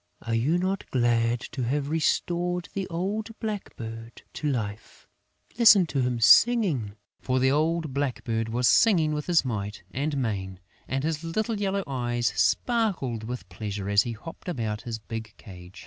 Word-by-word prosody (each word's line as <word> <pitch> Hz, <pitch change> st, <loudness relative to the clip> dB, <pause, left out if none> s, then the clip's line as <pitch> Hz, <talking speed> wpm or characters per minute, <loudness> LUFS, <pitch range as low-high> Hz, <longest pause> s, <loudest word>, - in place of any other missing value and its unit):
Are 115 Hz, -, -3 dB
you 130 Hz, +10 st, +2 dB
not 190 Hz, +2 st, -2 dB
glad 120 Hz, -1 st, +2 dB
to 135 Hz, -, -4 dB
have 140 Hz, +3 st, -1 dB
restored 175 Hz, +2 st, 0 dB
the 195 Hz, -1 st, -3 dB
old 205 Hz, +6 st, -3 dB
blackbird 115 Hz, -, -6 dB
to 150 Hz, -, -2 dB
life? 105 Hz, -5 st, -5 dB, 0.5 s
Listen 215 Hz, -5 st, +8 dB
to 145 Hz, -4 st, -1 dB
him 125 Hz, -1 st, 0 dB
singing!" 155 Hz, -, +5 dB, 0.2 s
For 130 Hz, 0 st, 0 dB
the 130 Hz, +1 st, +3 dB
old 155 Hz, 0 st, 0 dB
blackbird 120 Hz, -5 st, -2 dB
was 120 Hz, +2 st, +1 dB
singing 170 Hz, -9 st, +4 dB
with 150 Hz, +1 st, +1 dB
might 105 Hz, -5 st, -4 dB
and 145 Hz, +4 st, -2 dB
main; 95 Hz, -7 st, -3 dB, 0.3 s
and 135 Hz, +1 st, -2 dB
his 160 Hz, 0 st, -2 dB
little 215 Hz, +6 st, -2 dB
yellow 195 Hz, 0 st, 0 dB
eyes 120 Hz, -3 st, -1 dB
sparkled 185 Hz, -, 0 dB
with 125 Hz, +2 st, -6 dB
pleasure 100 Hz, -2 st, -5 dB
as 100 Hz, 0 st, +5 dB
he 120 Hz, 0 st, -3 dB
hopped 165 Hz, +10 st, -9 dB
about 110 Hz, -9 st, -3 dB
his 115 Hz, -2 st, -5 dB
big 110 Hz, 0 st, -7 dB
cage. 90 Hz, -2 st, -12 dB
130 Hz, 155 wpm, -26 LUFS, 115-170 Hz, 0.5 s, Listen